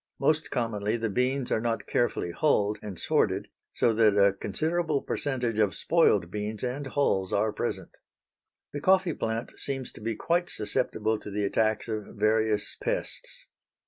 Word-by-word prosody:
Most 155 +3 +1
commonly 110 -2 -1
the 115 -2 -2
beans 125 +3 0
are 110 - +2
not 115 -1 -1
carefully 120 -7 0
hulled 105 - +1
and 100 -4 -7
sorted - - +1 0.2
so 115 - +2
that 110 -2 +4
a 100 -1 +5
considerable 155 - -1
percentage 120 -6 -2
of 105 -3 +2
spoiled 105 - +3
beans 105 +2 -4
and 130 +3 -3
hulls 100 -9 +1
are 110 +1 +1
present. - - -4 0.8
The 145 - -4
coffee 185 0 +3
plant 115 -1 -4
seems 135 -2 -3
to - - -13
be 115 +1 -2
quite 175 +8 0
susceptible 110 0 -1
to - - -8
the 100 0 -1
attacks 110 +3 +1
of 110 -2 -5
various 110 0 +1
pests. - - -3
110 Hz, 155 wpm, -28 LUFS, 105-135 Hz, 0.8 s, a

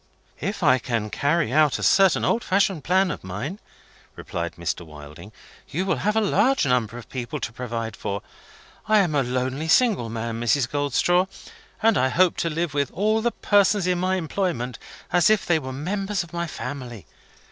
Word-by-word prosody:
"If - - -3
I 130 0 +5
can 115 -4 -3
carry 145 -3 0
out 150 -1 +4
a - - -6
certain 195 -3 +4
old 235 - +1
fashioned 190 -5 +1
plan 185 +2 +2
of - - -7
mine," 110 - -5 0.6
replied 85 0 -5
Mr. 85 0 -3
Wilding, 75 +4 -12 0.4
"you 180 +6 -2
will 195 - 0
have 210 +2 0
a 220 - +3
large 255 - +2
number 120 -3 0
to 120 -2 -5
provide 115 -3 -4
for. 100 0 -4 0.6
I 215 +1 +4
am 180 -6 +2
a 145 - +3
lonely 130 +4 -2
single 200 - +3
man, 115 0 -4
Mrs. 120 +2 +2
Goldstraw; 150 +6 +1 0.6
and 225 0 +4
I 130 +1 +2
hope 180 +6 +3
to 170 - 0
live 165 -1 -2
with 140 -2 0
all 215 +3 +1
the 240 - +2
persons 205 -3 +2
in 180 -1 +1
my 185 +1 +1
employment 165 -8 -2 0.3
as 175 +1 +5
if 215 -1 +2
they 165 -2 +2
were 130 -3 -6
members 195 +8 -2
of 170 - -15
my 170 0 -2
family. 125 - -7
150 Hz, 180 wpm, -24 LUFS, 120-185 Hz, 0.6 s, I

